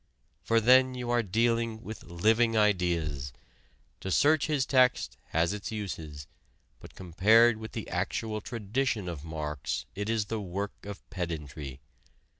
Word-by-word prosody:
For 115 0 +2
then 130 +3 +5
you 125 -1 -3
are 120 0 +3
dealing 115 +2 0
with 110 -1 -8
living 110 +6 +2
ideas: 85 -10 +1 0.7
to 95 - -5
search 150 - +3
his 145 -4 +1
text 130 -2 +3
has 85 +4 +1
its 105 +1 -5
uses, 80 -9 -6 0.5
but - - -14
compared 110 +6 +4
with 110 0 -8
the - - -5
actual 110 -1 -2
tradition 115 -1 -2
of 80 -5 -5
Marx 75 -3 -4
it 105 +2 -4
is 110 -2 +1
the 110 +1 -3
work 100 +2 -5
of 100 -1 -9
pedantry. 75 -7 -5
105 Hz, 140 wpm, -29 LUFS, 85-115 Hz, 0.7 s, then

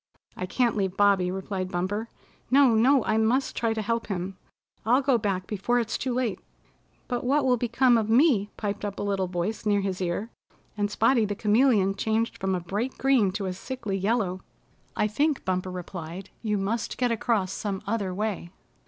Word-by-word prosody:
"I 185 - -4
can't 240 +4 +1
leave 195 -2 -1
Bobby," 200 -3 +4
replied 190 0 -3
Bumper. 205 +6 -2 0.4
"No, 270 -2 +5
no, 250 +3 +4
I 220 - +1
must 235 +5 +1
try 230 -1 0
to 220 - -2
help 230 +2 -1
him. 190 -1 -3 0.5
I'll 250 +5 +3
go 260 -3 +3
back 195 -3 -1
before 220 +5 0
it's 230 -1 -2
too 260 - -2
late." 240 -6 -1 0.7
"But 245 -2 -2
what 275 +3 +2
will 250 -1 +4
become 240 +1 +3
of 220 -1 -2
me?" 230 -5 +4
piped 205 -1 -3
up 205 -1 -4
a - - -3
little 195 -2 0
voice 180 +5 -3
near 205 -1 +2
his 195 -1 -3
ear, 185 +6 -2 0.4
and 205 -1 0
Spotty 230 +3 +3
the 205 0 -3
Chameleon 210 -2 +3
changed 220 +3 -1
from 190 0 0
a - - -1
bright 205 +9 -3
green 260 -8 +3
to 200 0 -3
a 185 - -2
sickly 205 0 -5
yellow. 195 -2 0 0.5
"I 210 - +2
think," 285 +7 0
Bumper 185 0 -1
replied, 180 0 -7
"you 210 -2 0
must 210 +4 -2
get 245 -1 +1
across 220 -4 0
some 200 -2 -4
other 200 -3 -1
way." 200 -2 -3
210 Hz, 190 wpm, -26 LUFS, 190-235 Hz, 0.7 s, No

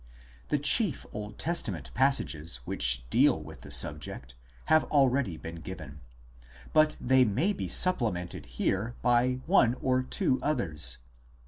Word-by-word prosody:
The 150 - 0
chief 155 - +2
Old 105 0 -7
Testa 170 -9 -1
ment 75 -8 -8
passages 85 - +1
which - - +1
deal - - +3
with - - -11
the - - -12
subject 75 -4 -1 0.3
have 155 0 +4
already 135 - +1
been 85 +1 -8
given, 75 -4 -9 0.6
2 - - -18
but 155 0 +3
they 130 +1 +3
may 130 - 0
be - - -5
supplemented 110 - +1
here 95 - -2
by 125 +1 +2
one 130 -9 +3
or 130 0 0
two 130 0 -1
others. 85 - 0
120 Hz, 140 wpm, -28 LUFS, -, 0.6 s, have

